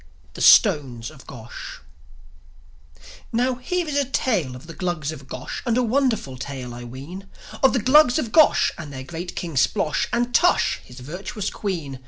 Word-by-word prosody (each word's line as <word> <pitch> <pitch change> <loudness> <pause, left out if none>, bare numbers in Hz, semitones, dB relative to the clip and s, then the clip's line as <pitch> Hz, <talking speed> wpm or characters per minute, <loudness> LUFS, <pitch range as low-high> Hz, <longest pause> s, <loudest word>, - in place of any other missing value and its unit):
THE - - -8
STONES 125 -5 +5
OF 140 -4 -16
GOSH 120 -3 -9 1.5
Now, 250 +3 +1
here 335 +8 -2
is 295 - -3
a 285 - +3
tale 210 - -1
of 125 - -11
the 165 - -9
Glugs 175 -5 -2
of 140 -4 -10
Gosh, 130 - -6
And 235 -1 0
a 250 - +3
wonderful 235 - 0
tale 130 -2 -6
I 120 0 -8
ween, 140 +11 -9 0.3
Of 265 - +5
the 245 -5 0
Glugs 260 0 +6
of 240 -8 -2
Gosh 310 +4 +5
and 155 -3 -7
their 130 -1 -7
great 170 +5 -7
King 170 -2 -4
Splosh, 145 +3 +1
And 240 +1 0
Tush, 355 - +3
his 125 +1 -13
virtuous 190 - -5
Queen. 160 -10 -4
175 Hz, 175 wpm, -23 LUFS, -, 1.5 s, Glugs